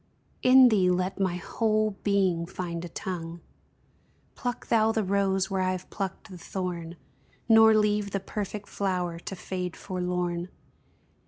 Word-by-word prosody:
In 255 0 +8
thee 195 -5 +3
let 185 +2 0
my 190 -3 +1
whole 215 +3 0
being 190 -5 +1
find 170 -1 -5
a 175 - -6
tongue; 170 -1 -5 0.9
Pluck 245 0 -4
thou 220 -1 +3
the 220 -1 0
rose 195 0 +1
where 190 -1 0
I 185 0 +1
have 185 -1 -7
plucked 195 0 -5
the 180 - -9
thorn, 175 -2 -5 0.5
Nor 225 -1 +7
leave 210 -1 +2
the 195 - -2
perfect 205 +1 -5
flower 180 -4 -2
to 195 - -7
fade 180 -2 -4
forlorn. 180 -1 -2
190 Hz, 145 wpm, -27 LUFS, 180-210 Hz, 0.9 s, In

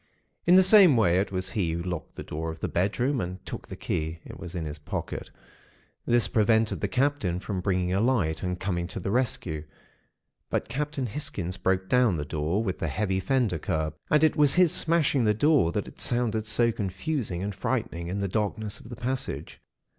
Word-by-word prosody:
"In 175 - +7
the 190 - +8
same 185 - +7
way, 90 -5 +4
it 100 - -1
was 95 -1 -2
he 90 -6 0
who 85 +1 -3
locked 90 -2 -5
the - - -6
door 80 +2 -4
of 80 0 -7
the - - -2
bedroom, 120 +8 0
and 90 +1 -6
took - - -7
the - - -7
key 80 +1 -3
(it - - -10
was 90 +1 -8
in 85 -2 -3
his 75 0 -6
pocket). 75 - -5 0.8
This 120 -4 +4
prevented 110 +2 +2
the - - +1
Captain 125 -10 0
from 95 0 -4
bringing 90 -1 0
a 95 - +2
light, 105 -11 +1
and 90 -1 -3
coming 90 -3 -2
to 90 - -6
the 100 - -3
rescue. 100 -10 -1 0.9
But - - -1
Captain 145 -1 -2
Hisgins 100 - -3
broke 95 0 0
down 125 -5 +3
the 75 - -3
door, 80 +8 -1
with 95 -4 -3
the 85 - -1
heavy 95 +4 -1
fender 105 -4 +1
curb; 80 0 -1 0.2
and 150 0 +4
it 155 - +4
was 145 -2 +4
his 180 -3 +5
smashing 155 -5 +2
the 105 -1 +3
door 145 - +3
that 100 +3 -2
had - - -12
sounded 115 -3 +1
so 115 +2 +3
confusing 100 - -3
and 100 +1 -3
frightening 95 -5 -2
in 95 +3 -3
the 100 - 0
darkness 105 +1 -2
of 115 - -13
the 120 - -6
passage. 125 +3 -4
100 Hz, 205 wpm, -27 LUFS, 90-125 Hz, 0.9 s, the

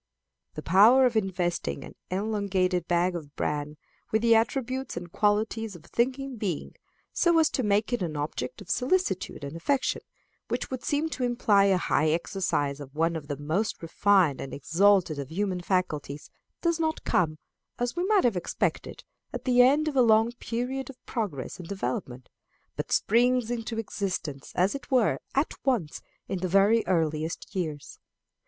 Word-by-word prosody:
The 155 - -6
power 220 +9 +6
of 245 -2 +1
investing 175 - -1
an - - -10 0.2
elongated 190 -3 0
bag 175 +1 +1
of 150 -4 -8
bran 150 0 -2 0.3
with 220 +1 +1
the 230 -1 +6
attributes 255 +1 0
and 175 -1 -7
qualities 215 +1 0
of 170 -1 -13
a - - -19
thinking 260 +2 -1
being, 190 -8 -3 0.4
so 340 -1 +3
as 320 -1 +4
to 260 - 0
make 210 +1 +1
it 240 - 0
an 160 -4 -3
object 145 -4 -4
of - - -12
solicitude 250 - 0
and 140 +3 -6
affection, 265 +11 0 0.5
which - - -3
would 260 -1 -4
seem 295 +2 0
to 260 - -4
imply 225 -5 +3
a 195 -2 +4
high 155 -3 +1
exercise 155 -4 -1
of 140 0 -10
one 165 +2 +1
of 155 -3 -6
the 145 -1 -4
most 160 +10 -1
refined 175 -3 +3
and 135 - -6
exalted 170 +1 +3
of 140 - -4
the 160 - -11
human 190 -2 -1
faculties, 155 -6 -2 0.3
does 340 -1 +1
not 320 -1 -1
come, 155 -3 +1 0.4
as 245 +3 -2
we 350 - -1
might 420 -2 +4
have 235 -5 +2
expected, 175 - -2 0.3
at - - -6
the 250 -1 +5
end 285 +5 +4
of 300 - -2
a 260 - +5
long 225 0 +4
period 250 +3 -3
of 270 - -10
progress 185 - -4
and 175 - -8
development, 130 -8 -4 0.5
but - - -5
springs 245 +1 +2
into 230 -1 -3
existence, 185 -10 -4
as 185 +3 +2
it 280 - -7
were, 255 -4 +2 0.2
at 275 +4 +1
once, 230 - 0 0.3
in 190 - -3
the 185 - -1
very 200 +5 +4
earliest 160 -2 -1
years. 155 -6 -4
200 Hz, 175 wpm, -27 LUFS, 165-245 Hz, 0.5 s, power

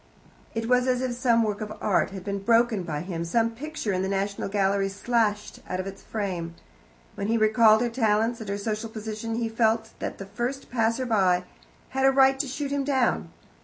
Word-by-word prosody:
It 225 0 -2
was 250 +1 +3
as 250 -1 +2
if 255 - -1
some 235 -2 +3
work 210 -1 -2
of 215 0 -4
art 200 - +2
had 190 -2 -8
been 200 0 -3
broken 230 0 +3
by 155 -4 -4
him, 170 -1 -4
some 230 +7 +1
picture 260 -3 -4
in 185 - 0
the 190 - -1
National 200 +1 -2
Gallery 195 -1 +1
slashed 210 +1 -1
out 185 - -2
of 185 - -3
its 195 0 -8
frame. 180 -6 -4 0.6
When 200 - -4
he 230 +1 +2
recalled 220 0 +5
her 240 - +1
talents 225 0 +1
and 220 -3 -7
her 200 - -1
social 215 +2 -3
position, 220 +1 -5
he 230 0 -1
felt 225 0 +1
that - - -4
the 195 - -7
first 245 +7 -4
passerby 225 -6 +2 0.4
had 265 0 0
a - - +6
right 270 0 +4
to 280 - 0
shoot 280 +2 -4
him 280 -1 0
down. 255 - +1
220 Hz, 200 wpm, -26 LUFS, 200-240 Hz, 0.6 s, a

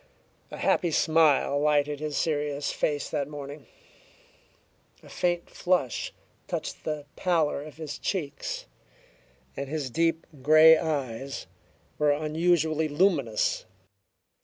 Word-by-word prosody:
A - - -8
happy 175 - +2
smile 155 -3 +3
lighted 145 -1 +2
his 150 -1 -3
serious 145 -2 -1
face 145 -2 -1
that 140 -2 -1
morning; 145 -1 -8 1.4
a - - -14
faint 175 -1 -1
flush 175 -10 -1 0.4
touched - - -5
the 150 -2 -3
pallor 165 -6 +1
of 155 -1 -11
his 155 -3 -6
cheeks; 205 - -3 0.9
and 140 -1 -5
his 145 -4 -3
deep 165 +3 +1 0.2
grey 155 +3 +8
eyes 135 -4 -3 0.5
were 150 -1 +3
unusually 155 +1 +1
luminous. 145 - +1
150 Hz, 110 wpm, -27 LUFS, 145-160 Hz, 1.4 s, grey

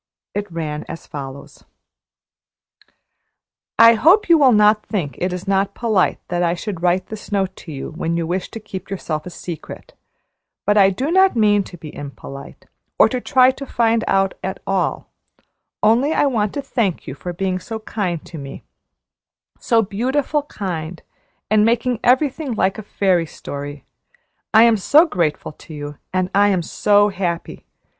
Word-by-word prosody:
It 205 -2 -4
ran 155 -2 -4
as 165 - -8
follows: 140 -1 -9 2.1
"I 230 0 +8
hope 345 - +4
you 335 - +7
will 270 -3 +6
not 210 -1 +4
think 165 - -3
it 180 +1 -1
is 180 +2 -6
not 195 0 +1
polite 220 -6 +1
that 175 0 -1
I 170 0 +1
should 180 -1 -5
write 180 +1 +1
this 215 -1 -9
note 190 -2 0
to 165 - -10
you 140 +1 -6
when 165 +1 -2
you 170 - -1
wish 180 +3 -3
to 225 - -8
keep 195 -3 -8
yourself 170 -5 -4
a - - -5
secret, 170 -2 -9 0.7
but 205 - +3
I 195 -2 +6
do 260 - -2
not 380 -1 +4
mean 205 -3 +3
to 175 - -11
be 155 -2 -10
impolite, 140 -1 -9 0.3
or - - +6
to 255 -1 -3
try 255 +1 +4
to 275 +1 -8
find 230 -2 +1
out 195 0 +2
at 190 0 -4
all, 190 -2 -1 0.7
only 245 +8 +3
I - - +2
want 215 -7 0
to 285 - -3
thank 210 -11 -1
you - - -6
for 175 +6 -6
being 185 +1 -2
so 225 +4 -6
kind 195 -6 -3
to 165 - -9
me 135 -1 -9 1.0
so 230 -1 +2
beautiful 260 +9 -1
kind, 170 -4 -5 0.5
and 215 -1 +5
making 235 +1 +1
everything 265 +1 +2
like 195 +1 0
a - - -4
fairy 185 -5 +1
story. 145 0 -8 0.7
I 220 +1 +7
am 230 -1 +5
so 295 - +5
grateful 170 - -1
to 155 +1 -13
you 145 0 -7
and 185 0 -1
I 205 +1 +5
am 190 -4 +1
so 205 +4 +3
happy! 175 -4 -4
195 Hz, 170 wpm, -20 LUFS, 170-225 Hz, 2.1 s, I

